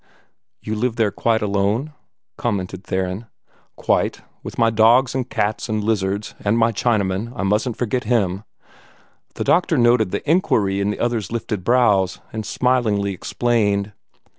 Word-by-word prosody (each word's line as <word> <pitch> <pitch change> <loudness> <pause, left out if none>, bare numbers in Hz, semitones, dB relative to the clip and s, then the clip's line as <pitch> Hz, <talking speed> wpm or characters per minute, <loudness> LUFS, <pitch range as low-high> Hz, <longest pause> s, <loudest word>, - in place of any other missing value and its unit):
"You 110 - -3
live 115 +2 -1
there 110 -4 +1
quite 110 +1 0
alone," 105 +8 0 0.4
commented 95 -4 -3
Theron. 95 +4 -3 0.5
"Quite - - 0 0.2
with - - -8
my 115 -1 +3
dogs 115 +4 +4
and 130 -1 -2
cats 110 +3 -1
and 110 -1 -1
lizards 100 -1 -1
and 105 +2 +2
my 115 0 +3
Chinaman. 105 -1 0
I 90 - -3
mustn't 105 +4 0
forget 125 +1 -1
him." 100 -4 0 0.9
The - - -2
doctor 170 -3 +2
noted 120 -4 +4
the - - -4
inquiry 110 - +2
in 100 - 0
the 105 - -3
other's 115 -4 -1
lifted 110 -4 -3
brows, 105 -5 +2
and 110 -2 -4
smilingly 110 -7 +1
explained. 105 0 0
110 Hz, 145 wpm, -21 LUFS, 100-120 Hz, 0.9 s, dogs